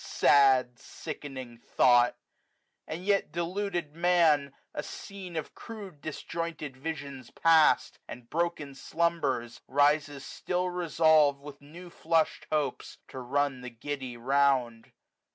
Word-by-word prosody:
Sad, 130 -3 +4
sickening 135 -5 -8
thought! 120 0 +3 0.7
and 170 +4 -6
yet 200 -5 +1
deluded 175 -2 -3
Man, 165 -5 +3 0.2
A - - -3
scene 190 -3 -9
of 160 - -4
crude 200 -9 -10
disjointed 155 -2 -5
visions 140 -3 -6
past. 160 -5 +3
And 120 -1 -10
broken 160 -2 -2
slumbers, 140 -6 -2
rises 145 0 +1
still 180 0 -2
resolv'd, 160 -4 +3
215 - - -17 0.2
With 150 - -17
new 175 0 -10
flush'd 165 -1 0
hopes, 150 -2 -2
to 130 - -8
run 135 +1 -1
the 125 - -7
giddy 130 +1 -6
round. 125 -3 +1
145 Hz, 115 wpm, -29 LUFS, 130-170 Hz, 0.7 s, Sad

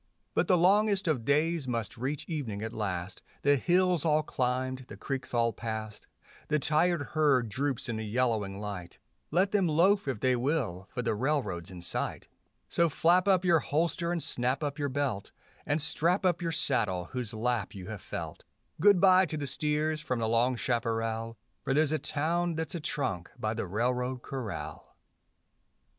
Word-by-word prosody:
But - - +1
the 180 - +5
longest 200 +2 +3
of 140 -8 +1
days 155 +1 +2
must 115 -3 -2
reach 135 +4 -3
evening 120 - -4
at 110 +1 -4
last, 95 -3 -3 0.2
The 145 0 +5
hills 180 +3 +2
all 155 -1 +3
climbed, 130 -1 -2
the 105 - -10
creeks 130 +3 -4
all 115 -1 +2
past; 110 -2 -6 0.4
The 150 - +2
tired 160 +2 +2
herd 140 -7 +3
droops 135 +3 -2
in 115 -2 -2
the 110 - -3
yellowing 110 -3 0
light; 100 -4 -6 0.3
Let 185 +5 +2
them 195 -4 +2
loaf 180 +4 +3
if 130 -6 -2
they 130 +2 +2
will, 120 - -1
for 125 - -3
the 115 - +1
railroad's 105 - -1
in 90 -2 -9
sight 85 - -3 0.4
So 170 -1 +2
flap 175 +5 +3
up 185 -2 +4
your 170 -2 +5
holster 170 +3 0
and 170 -4 -1
snap 125 +4 0
up 145 +1 -3
your 145 -1 0
belt, 130 -7 -2 0.4
And 145 +2 +1
strap 165 +5 +1
up 175 -1 +2
your 165 -1 -1
saddle 105 - 0
whose 125 -4 -3
lap 115 -2 -1
you 95 -2 -7
have 105 -3 -6
felt; - - -6 0.4
Good 200 +2 +6
bye 185 0 +6
to 155 - -4
the 145 - -3
steers 150 +2 0
from 125 -4 -2
the 115 -1 0
long 120 +3 +2
chaparral, 115 -1 -1 0.3
For 135 - 0
there's 155 0 +3
a 155 - +1
town 165 +5 -1
that's 160 0 -3
a 170 - -3
trunk 95 - -2
by 110 -3 -1
the 110 -3 -3
railroad 125 +5 -1
corral. 105 - -6
135 Hz, 180 wpm, -30 LUFS, 115-160 Hz, 0.4 s, Good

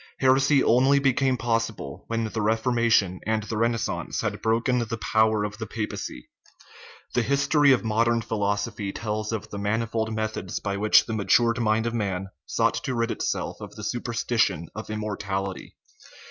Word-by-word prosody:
Heresy 135 +1 +4
only 130 +4 +4
became 135 -1 +2
possible 115 - -2
when 115 0 -1
the 110 0 -3
Reformation 110 -3 +2
and 110 -1 +1
the 110 - -5
Renaissance 115 -1 -1
had - - -3
broken 115 +3 +1
the 115 -1 -3
power 110 -1 +2
of 105 +1 -5
the 110 - -4
pa 110 +1 -3
pacy. 60 - -7 0.9
The 125 - +2
history 140 +3 +3
of 130 - +3
modern 115 +1 +1
philosophy 100 -2 -2
tells 110 +1 -3
of 110 -2 -5
the 100 - -5
manifold 110 +2 -1
methods 110 -4 -3
by 100 - -3
which 105 +1 +5
the 110 - -4
matured 115 +3 +3
mind 110 0 +1
of 115 - -1
man 95 -4 -2 0.2
sought - - +1
to 130 - -2
rid 115 0 0
itself - - -2
of - - -9
the - - -8
superstition 80 +1 -1
of 110 +1 -7
immortality. 100 -3 -4
110 Hz, 160 wpm, -25 LUFS, 105-115 Hz, 0.9 s, which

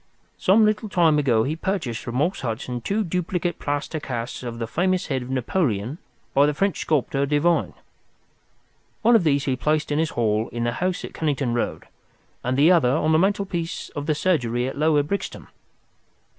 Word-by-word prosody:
Some 215 +4 +5
little 215 0 0
time 165 -6 +3
ago 120 -6 +3
he 150 +5 -1
purchased 165 - -2
from 120 - -5
Morse 160 +9 0
Hudson 120 +1 -4
two 205 - 0
duplicate 180 -1 -2
plaster 145 +2 -2
casts 120 -5 -5
of 120 -2 -6
the 115 - -3
famous 180 +10 0
head 135 -2 -2
of 125 - -8
Napoleon 130 - -1 0.3
by 140 +1 +5
the 150 - 0
French 195 +2 0
sculptor, 140 -2 0
Devine. 150 +4 +1 1.3
One 235 +2 +6
of 220 - +4
these 145 -3 +2
he 130 - +1
placed 150 +4 0
in 145 - +1
his 160 -1 +1
hall 110 -1 0
in 120 0 -3
the 120 - +1
house 180 +9 -2
at - - -10
Kennington 140 -6 -1
Road, 120 - -2 0.6
and 130 +1 -1
the 150 +5 +6
other 165 -9 +4
on 155 +4 +1
the 160 - +4
mantelpiece 190 -3 -1
of 145 0 -6
the 155 - +2
surgery 125 -8 0
at 135 - -5
Lower 150 0 +3
Brixton. 200 +7 -4
150 Hz, 185 wpm, -23 LUFS, 125-175 Hz, 1.3 s, One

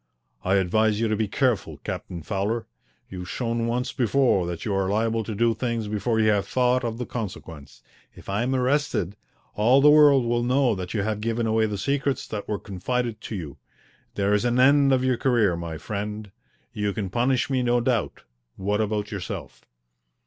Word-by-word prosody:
I 95 +2 +2
advise 105 +3 +2
you 115 - +1
to 110 - +1
be 110 0 -1
careful, 105 - 0
Captain 85 -3 -5
Fowler. 105 +5 -2 0.4
You've 90 -1 -8
shown 115 -1 -2
once 125 +2 -1
before 120 -6 +2
that 85 -1 -5
you 105 - -1
are 95 -1 0
liable 110 +2 0
to 110 0 -5
do 115 +2 +2
things 115 -1 -2
before 105 +2 -1
you 110 -1 +4
have 100 -1 0
thought 125 +2 +2
of 115 -1 -3
the 125 - -4
consequence. 80 - -7 0.3
If - - -15
I 100 +3 -1
am 130 +2 0
arrested 130 - 0 0.4
all 115 +6 +4
the 150 +2 +7
world 145 -4 +6
will 120 0 +1
know 125 +1 +2
that 95 +1 -5
you 100 - 0
have 105 0 -2
given 115 +1 -1
away 110 0 +2
the 105 -1 -3
secrets 140 +5 -1
that 105 -2 -5
were 105 - -1
confided 110 +4 -3
to 110 - -6
you. 80 -8 -7 0.6
There 100 0 +1
is 105 - +2
an 120 0 +1
end 140 +1 +5
of 130 -1 +2
your 130 -2 +1
career, 115 -9 +2
my 85 -1 -5
friend. 105 +3 -5 0.4
You 105 -1 -1
can 100 -4 -4
punish 125 +4 +1
me, 130 -1 +1
no 120 0 +2
doubt. 120 -4 -1 0.3
What 105 +2 0
about 105 -1 -2
yourself?" 95 -3 -6
110 Hz, 190 wpm, -25 LUFS, 100-125 Hz, 0.6 s, the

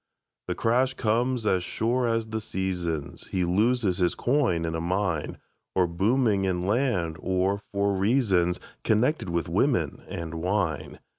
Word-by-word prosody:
The - - -2
crash 130 +3 +1
comes 120 +1 0
as 95 -4 +2
sure 120 +6 0
as 115 -1 0
the 110 0 -4
seasons; 90 -7 -3
He 95 -2 0
loses 105 +1 +2
his 90 -1 +2
coin 120 - +1
in 80 - -2
a 80 - -2
mine, 90 -2 -1 0.4
Or 95 - +4
booming 100 +4 +2
in 90 -2 0
land, 100 -8 0
or 95 +2 0
for 100 0 +1
reasons 95 -4 +2 0.2
Connected 115 - +1
with 85 -2 -1
women - - +1
and 85 -1 -5
wine. 80 -4 -1
95 Hz, 145 wpm, -26 LUFS, 85-115 Hz, 0.4 s, Or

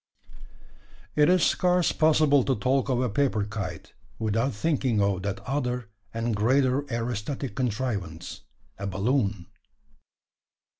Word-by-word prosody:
It 150 +1 +5
is 180 -2 +4
scarce 180 -1 +3
possible 155 -3 +4
to 135 - +1
talk 130 +5 +1
of 125 -2 +1
a 125 - +1
paper 115 -2 +1
kite, 100 -5 -6 0.2
without 115 +4 0
thinking 130 -1 0
of 100 -2 +1
that 100 0 -3
other 125 -4 -2 0.2
and 115 0 -1
greater 130 +5 +2
aerostatic 120 +2 -3
contrivance 105 -9 -3 0.4
a 100 - -3
balloon. 100 -1 0
120 Hz, 115 wpm, -26 LUFS, 105-135 Hz, 0.4 s, It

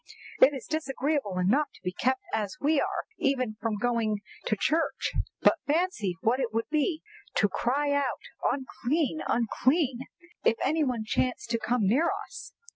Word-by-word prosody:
"It 280 - +8
is 260 - -7
disagreeable 280 -8 -1
enough 235 +12 +3
to - - -18
be 180 - -1
kept 260 +7 0
as 215 +4 -1
we 290 0 +3
are - - -1 0.2
even 255 -5 +1
from 225 -2 -1
going 220 -2 0 0.3
to 215 - +2
church, 320 +11 0 0.3
but - - +5
fancy 290 - 0
what 240 +4 +2
it 245 -4 -1
would 225 +1 -1
be 310 +1 +1 0.3
to - - +3
have - - +2
to - - -5
cry 285 +4 +1
out 285 -3 0 0.3
'Unclean! 280 +3 -1
unclean!' 255 +3 +1 0.4
if - - +4
any 310 +4 +2
one 250 -5 -1
chanced 240 +1 -1
to 230 - +1
come 240 +1 0
near 280 - +3 0.2
us!" - - -10
255 Hz, 170 wpm, -28 LUFS, 225-290 Hz, 0.4 s, It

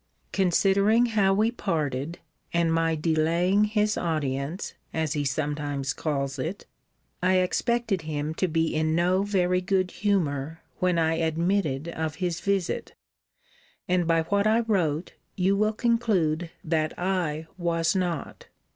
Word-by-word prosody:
Considering 200 +5 +3
how 210 -5 +2
we 215 +4 +2
parted, 160 - -2 0.3
and 170 -1 +2
my 165 0 +2
delaying 170 +5 +2
his 210 0 +1
audience, 155 0 -2 0.2
as 160 -2 0
he 145 -2 -1
sometimes 145 -1 -2
calls 140 -3 -2
it, 180 +6 -4 0.6
I 185 +1 +3
expected 200 +2 +1
him 155 -1 -3
to 185 - 0
be 165 -1 0
in 155 0 +1
no 180 +3 +2
very 180 -3 +1
good 185 -1 0
humour, 160 -7 -1 0.2
when 180 -1 +2
I 160 0 +2
admitted 165 -2 0
of 160 -2 -3
his 175 -1 -2
visit; 195 0 -1 0.9
and 180 -2 +1
by 165 -1 +3
what 200 +5 +1
I 225 +2 +4
wrote, 180 -8 0 0.2
you 190 +1 +2
will 215 +2 +2
conclude 205 -9 +1
that 155 -1 -1
I 175 -4 -1
was 170 0 +1
not. 175 -5 -3
170 Hz, 135 wpm, -26 LUFS, 155-195 Hz, 0.9 s, I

